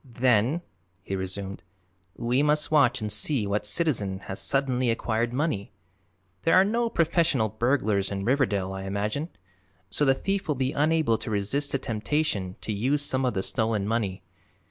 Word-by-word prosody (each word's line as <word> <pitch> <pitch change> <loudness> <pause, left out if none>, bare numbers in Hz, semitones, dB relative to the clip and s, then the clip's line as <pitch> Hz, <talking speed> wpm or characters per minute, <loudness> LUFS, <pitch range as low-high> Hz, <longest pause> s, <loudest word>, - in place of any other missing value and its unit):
"Then," 125 +4 +1 0.4
he 95 - -3
resumed, 95 +1 -5 0.5
"we 120 +3 +1
must 150 +1 +2
watch 130 -5 +4
and 105 -1 -3
see 110 +2 +3
what 105 +1 -1
citizen 105 - 0
has 95 0 -5
suddenly 130 -3 +1
acquired 115 0 0
money. 130 -6 -2 0.7
There 165 - +3
are 185 - +7
no 230 +3 0
professional 165 - +2
burglars 110 -4 0
in 100 -1 -4
Riverdale, 105 -8 +1
I 95 0 -6
imagine, 105 - -2 0.6
so 145 - 0
the 135 -2 +4
thief 195 +6 -2
will 150 - 0
be 130 +1 -1
unable 150 -6 +2
to - - -5
resist 110 +8 -1
the - - +1
temptation 110 -5 -1
to 110 - -3
use 135 +8 +1
some 135 -2 0
of 125 - 0
the 95 - -1
stolen 110 -4 0
money. 100 -5 -2
120 Hz, 165 wpm, -26 LUFS, 100-145 Hz, 0.7 s, are